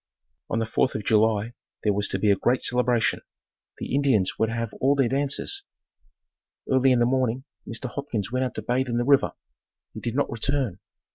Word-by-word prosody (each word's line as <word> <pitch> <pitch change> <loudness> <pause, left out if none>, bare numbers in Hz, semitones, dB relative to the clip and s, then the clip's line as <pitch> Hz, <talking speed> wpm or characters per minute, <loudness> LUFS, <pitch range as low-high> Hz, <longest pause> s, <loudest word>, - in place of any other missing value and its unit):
On - - -1
the 115 - 0
Fourth 115 +3 0
of 110 - -3
July 110 +1 +2 0.3
there 105 - +2
was 100 0 0
to - - -1
be 105 +2 +3
a - - +5
great 120 +6 +1
celebration. 125 -2 +2 0.6
The - - -5
Indians 135 -9 +2
were 110 - +3
to 115 - -4
have 115 -2 -3
all 140 +2 +4
their 135 -3 +3
dances. 140 - -1 1.1
Early 130 0 +4
in 125 - +4
the 120 - +3
morning, 130 0 0 0.2
Mr. 115 +3 -5
Hopkins 120 -5 -4
went 130 +1 0
out 125 - -3
to 110 - -5
bathe 125 +3 0
in 120 - 0
the 120 - +1
river. 140 +1 +3 0.6
He - - -7
did 120 0 -4
not 145 - 0
return. 120 -4 -1
120 Hz, 200 wpm, -25 LUFS, 110-130 Hz, 1.1 s, a